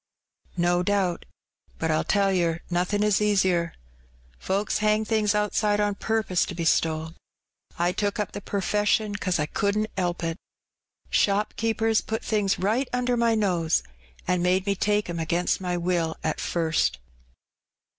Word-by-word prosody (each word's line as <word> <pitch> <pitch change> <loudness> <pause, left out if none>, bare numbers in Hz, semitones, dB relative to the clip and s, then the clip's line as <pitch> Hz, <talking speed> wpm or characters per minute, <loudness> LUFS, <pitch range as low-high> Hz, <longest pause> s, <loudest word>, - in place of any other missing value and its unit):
"No 175 0 +2
doubt. 190 -2 0 0.5
But, 160 0 -1
I'll 155 - +1
tell 200 -1 +2
yer, 170 -2 0
nothin' 180 +4 +1
is 210 -1 +2
easier. 185 -5 +2 0.6
Folks 200 +3 -1
hang 215 +1 +2
things 215 -1 +1
outside 210 0 +1
on 205 0 +1
purpose 210 -4 0
to 185 - -6
be 170 -1 -3
stole. 160 0 +1 0.6
I 175 +1 +2
took 205 +3 -2
up 210 - -2
the 205 - -6
per 200 0 -3
fession 210 +1 +1
'cause 185 -2 0
I 150 - 0
couldn't 205 +6 -1
'elp 175 -2 -1
it. 165 0 -2 0.7
Shopkeepers 220 +2 +1
put 220 +1 -4
things 205 -3 +1
right 225 +8 0
under 245 0 0
my 230 -1 +2
nose, 180 -6 +1 0.4
an' 180 0 +1
made 185 +1 +2
me 200 - +1
take 210 +1 0
'em 170 -1 -4
against 170 +3 0
my 180 -1 -1
will 170 -2 -1
at 155 - -1
fast. 165 -2 0
195 Hz, 155 wpm, -25 LUFS, 175-210 Hz, 0.7 s, No